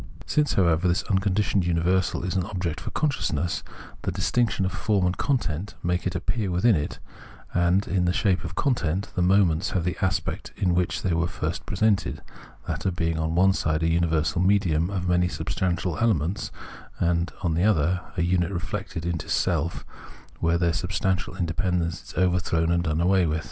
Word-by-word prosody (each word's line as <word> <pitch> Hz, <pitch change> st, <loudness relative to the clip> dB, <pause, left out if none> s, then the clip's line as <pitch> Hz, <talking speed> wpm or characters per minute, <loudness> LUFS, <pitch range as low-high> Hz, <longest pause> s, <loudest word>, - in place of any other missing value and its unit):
Since, 150 Hz, -1 st, +1 dB
however, 85 Hz, -2 st, +3 dB
this 90 Hz, +1 st, +1 dB
unconditioned 100 Hz, 0 st, +1 dB
universal 90 Hz, +2 st, +1 dB
is 90 Hz, -, -2 dB
an 95 Hz, 0 st, 0 dB
object 90 Hz, -5 st, -3 dB
for -, -, -5 dB
consciousness, 85 Hz, -, -1 dB, 0.4 s
the -, -, -2 dB
distinction 115 Hz, -5 st, +1 dB
of 95 Hz, -, -1 dB
form 95 Hz, +1 st, +1 dB
and 90 Hz, 0 st, +1 dB
content 105 Hz, -, -1 dB
makes 90 Hz, +1 st, 0 dB
its 90 Hz, -, -3 dB
appearance 100 Hz, +2 st, -1 dB
within 110 Hz, +5 st, +4 dB
it; 75 Hz, -2 st, -2 dB, 0.6 s
and, 90 Hz, +3 st, +2 dB
in 90 Hz, -1 st, +1 dB
the 90 Hz, -, +3 dB
shape 95 Hz, -1 st, +1 dB
of 85 Hz, 0 st, -6 dB
content, 95 Hz, -, 0 dB
the 90 Hz, -, +1 dB
moments 90 Hz, -1 st, +3 dB
have 90 Hz, -, -1 dB
the 90 Hz, +2 st, -1 dB
aspect 95 Hz, -1 st, -2 dB
in 90 Hz, -2 st, +1 dB
which 90 Hz, 0 st, 0 dB
they 95 Hz, -, +1 dB
were 85 Hz, +1 st, +1 dB
first -, -, -4 dB
presented 100 Hz, +2 st, +1 dB, 0.2 s
— -, -, -21 dB
that -, -, -2 dB
of 90 Hz, -, 0 dB
being 80 Hz, -2 st, -1 dB
on 80 Hz, +1 st, -1 dB
one 95 Hz, +2 st, +5 dB
side 80 Hz, -3 st, 0 dB
a -, -, +3 dB
universal 80 Hz, -1 st, +1 dB
medium 90 Hz, -4 st, +2 dB
of 90 Hz, -2 st, -2 dB
many 90 Hz, 0 st, +3 dB
substantial 90 Hz, -1 st, -2 dB
elements, 100 Hz, -3 st, 0 dB, 0.5 s
and, 85 Hz, -1 st, +1 dB
on 85 Hz, -3 st, +1 dB
the 85 Hz, +3 st, +1 dB
other, 90 Hz, -3 st, +2 dB, 0.2 s
a 85 Hz, -, +2 dB
unit 90 Hz, 0 st, +1 dB
reflected 85 Hz, -1 st, -4 dB
into 80 Hz, -2 st, -3 dB
self, 85 Hz, -1 st, 0 dB, 0.5 s
where 85 Hz, 0 st, +2 dB
their 85 Hz, -1 st, +1 dB
substantial 90 Hz, +1 st, -1 dB
independence 90 Hz, -1 st, -1 dB
is -, -, -16 dB
overthrown 90 Hz, -2 st, +1 dB
and 85 Hz, 0 st, +1 dB
done 80 Hz, +1 st, 0 dB
away 90 Hz, 0 st, +3 dB
with. 80 Hz, 0 st, 0 dB
90 Hz, 180 wpm, -25 LUFS, 85-95 Hz, 0.6 s, one